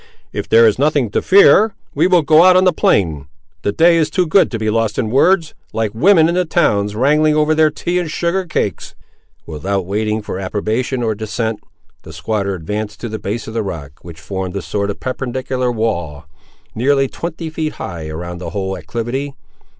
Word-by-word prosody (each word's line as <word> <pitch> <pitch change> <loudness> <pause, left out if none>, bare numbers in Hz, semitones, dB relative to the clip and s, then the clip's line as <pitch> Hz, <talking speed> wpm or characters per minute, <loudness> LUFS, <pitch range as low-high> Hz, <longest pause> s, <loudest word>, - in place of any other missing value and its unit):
"If - - -4
there 115 +1 +6
is 110 +2 +2
nothing 145 -6 +1
to - - 0
fear, 200 +2 +5 0.2
we 160 +5 +2
will 180 -3 +3
go 155 +2 +5
out 185 0 +6
on 185 - +4
the 185 -2 +3
plain; 80 - +1 0.3
the 100 - 0
day 170 +8 +4
is 160 -2 +1
too 180 +3 +1
good 185 +4 +3
to 115 - -4
be 110 -1 -1
lost 115 -1 0
in 110 -3 -1
words, 165 +4 +3 0.2
like 110 -2 -1
women 160 - +4
in 170 - 0
the 180 +1 +2
towns 105 - +1
wrangling 150 +5 +3
over 155 +1 +2
their 155 0 +4
tea 175 +4 -2
and 175 -3 -3
sugared 175 +3 -2
cakes." 100 - -3 0.5
Without 95 +4 -3
waiting 105 +3 -2
for 95 - -5
approbation 110 +6 -2
or 110 -1 0
dissent, 110 +1 -3 0.4
the - - -12
squatter 100 +4 -2
advanced 105 +5 -5
to 120 - -4
the 110 0 -5
base 105 +3 -4
of 110 - -7
the 115 - -1
rock, 75 -8 -7
which 80 -1 -11
formed 95 +3 -5
a 100 - -3
sort 100 +5 -2
of 100 - -5
perpendicular 130 -1 -3
wall, 85 -10 -3 0.5
nearly 135 +3 +2
twenty 165 +2 -6
feet 155 -1 -3
high 85 -4 -7
around 85 +3 -6
the 90 - -6
whole 95 -2 -3
acclivity. 120 - -4
115 Hz, 195 wpm, -17 LUFS, 100-155 Hz, 0.5 s, there